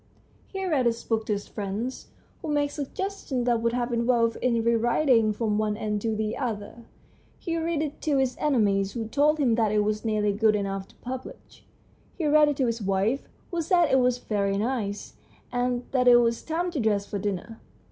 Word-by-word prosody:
He 385 -1 -4
read 290 -9 +2
his 230 0 -1
book 220 -1 -1
to 210 - +1
his 205 0 -4
friends, 210 +5 -4 0.3
who - - -6
made 290 -1 +1
suggestions 290 -2 -4
that 240 -2 +2
would 230 0 +1
have 240 0 -1
involved 235 -1 +2
its 235 -2 +1
re 235 - +4
writing 235 -1 +3
from 210 -1 -1
one 210 -1 0
end 210 -1 -2
to 225 0 -1
the 215 0 -2
other. 230 -2 -5 0.5
He 335 -2 -3
read 330 -2 -1
it 300 -1 -6
to 295 -3 +1
his 260 -2 +1
enemies, 200 -9 +2
who 225 -2 -4
told 290 +6 +2
him 265 -6 +2
that 225 -2 +2
it 210 0 +2
was 215 0 -1
nearly 210 -2 +1
good 215 +1 +3
enough 195 -1 -3
to - - -22
publish; 255 +1 -9 0.5
he 335 - -2
read 300 0 +5
it 290 - -2
to 265 - +2
his 230 -1 -2
wife, 200 +7 0 0.2
who 345 -1 -1
said 345 0 +3
that - - -2
it 265 - +5
was 250 -1 +2
very 200 -4 -1
nice, 210 -2 -3 0.3
and 245 0 -1
that 250 -2 +2
it 245 - +9
was 235 -1 +3
time 345 +3 -2
to 315 - -3
dress 210 -3 +1
for 200 - -4
dinner. 205 +3 -4
235 Hz, 210 wpm, -26 LUFS, 215-275 Hz, 0.5 s, it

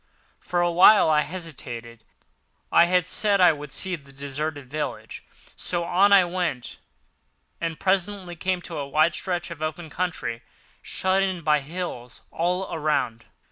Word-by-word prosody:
For 175 -1 -1
a 175 0 +2
while 180 0 +7
I 150 -1 +4
hesitated. 120 -9 -6 0.7
I 170 - +6
had 180 0 +2
said 205 +1 +2
I 180 - +7
would 150 -1 -7
see 190 -1 -1
the 140 -4 -15
deserted 140 +1 -5
village, 150 +4 -5 0.3
so 175 -1 -1
on 190 +4 +3
I 195 -2 +7
went, 175 -8 -3 0.8
and 165 -2 -3
presently 190 -1 0
came 185 +1 -2
on 165 - -6
a 140 -1 -4
wide 155 +4 +3
stretch 175 0 -2
of 160 -2 -8
open 155 0 -4
country, 140 -11 -3 0.4
shut 190 +1 0
in 190 -3 -1
by 150 -1 +3
hills 140 -5 -7
all 180 +3 -1
around. 150 -7 -1
170 Hz, 150 wpm, -24 LUFS, 150-180 Hz, 0.8 s, while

